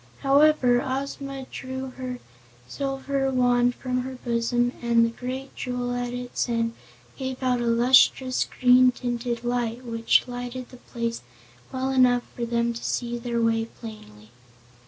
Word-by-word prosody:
However, 275 -3 +4
Ozma 275 0 -4
drew 260 0 -5
her 255 -1 -6 0.5
silver 270 - -2
wand 245 -1 +3
from 255 -1 -2
her 260 +1 -6
bosom 240 +1 +1
and 235 -1 +4
the 230 - -1
great 260 +3 -6
jewel 245 -1 -3
at 245 0 -2
its 245 0 -3
end 230 -1 0 0.4
gave 260 -1 -5
out 250 -1 +1
a 240 - -1
lustrous, 255 +2 +4
green 250 0 +6
tinted 240 -1 -3
light 240 0 -2
which 230 0 +2
lighted 245 0 -6
the 250 - -13
place 235 -1 -4 0.5
well 260 0 -1
enough 250 -2 +4
for 240 - -2
them 235 0 0
to 235 - -8
see 240 -1 -2
their 235 0 -2
way 225 -1 +2
plainly. 110 - -12
245 Hz, 145 wpm, -25 LUFS, 235-260 Hz, 0.5 s, green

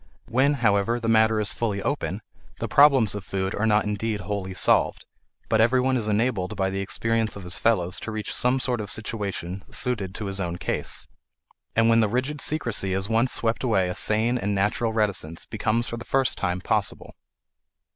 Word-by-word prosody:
When, 135 +5 +3
however, 115 -1 +1
the 115 - -4
matter 110 -1 +4
is 100 -2 -1
fully 105 -3 -2
open, 110 -8 -2 0.3
the - - -3
problems 135 -7 +5
of 105 -2 -5
food 95 0 -3
are 110 +2 0
not 105 -1 +3
indeed 105 0 -2
wholly 95 0 -4
solved, - - +2 0.4
but 110 - +3
everyone 130 +3 +3
is 115 -4 -1
enabled 105 -2 0
by 95 -1 0
the 95 - -3
experience 115 +2 -1
of 100 - -8
his 90 +2 -3
fellows 90 -5 +1
to 115 - -6
reach 110 -2 -4
some 125 +2 +3
sort 125 -3 0
of 100 - -6
situation 100 -4 -3
suited 100 -7 -2
to 105 - -4
his 100 0 -3
own 90 -2 -3
case. - - -2 0.7
And 115 0 +4
when 115 0 +5
the 110 -2 +2
rigid 130 +6 -2
secrecy 120 -10 -1
is 95 +2 -2
once 115 +3 +2
swept 115 +2 0
away 95 -7 +2
a - - -2
sane 110 +5 +1
and 100 -1 -1
natural 105 +4 0
reticence 100 -7 -1
becomes 110 +2 -1
for 120 - -5
the 115 - -7
first 135 0 +1
time 90 -1 -2
possible. - - +1
110 Hz, 190 wpm, -25 LUFS, 100-115 Hz, 0.7 s, problems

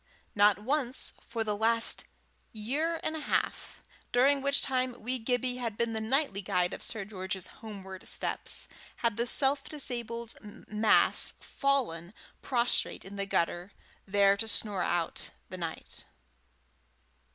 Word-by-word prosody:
Not 205 -2 +5
once, 260 +3 0
for 230 -1 -1
the 210 -1 -1
last 230 +2 +3 0.5
year 290 +10 -1
and 315 - -1
a - - -3
half, 295 - -1 0.3
during 275 +3 +4
which 280 +1 +3
time 255 -2 0
wee 250 +3 -1
Gibbie 250 +1 0
had 230 -4 -3
been 235 -1 +1
the 220 - -2
nightly 230 -3 +1
guide 180 -1 +1
of - - -6
Sir 205 -3 +1
George's 190 -2 -4 0.2
homeward 190 -4 -8
steps, - - 0 0.4
had 230 -3 +3
the 235 +3 0
self 275 +3 +2
disabled 235 -5 -2
mass 210 +1 +2
fallen 220 -10 -1 0.3
prostrate 240 -6 0
in 195 +1 -8
the 200 0 -2
gutter, 175 +1 0 0.3
there 200 0 +5
to 225 - -1
snore 205 -3 -1
out 175 -1 0 0.2
the 185 - -6
night. 165 -2 -5
225 Hz, 140 wpm, -31 LUFS, 200-255 Hz, 0.5 s, Not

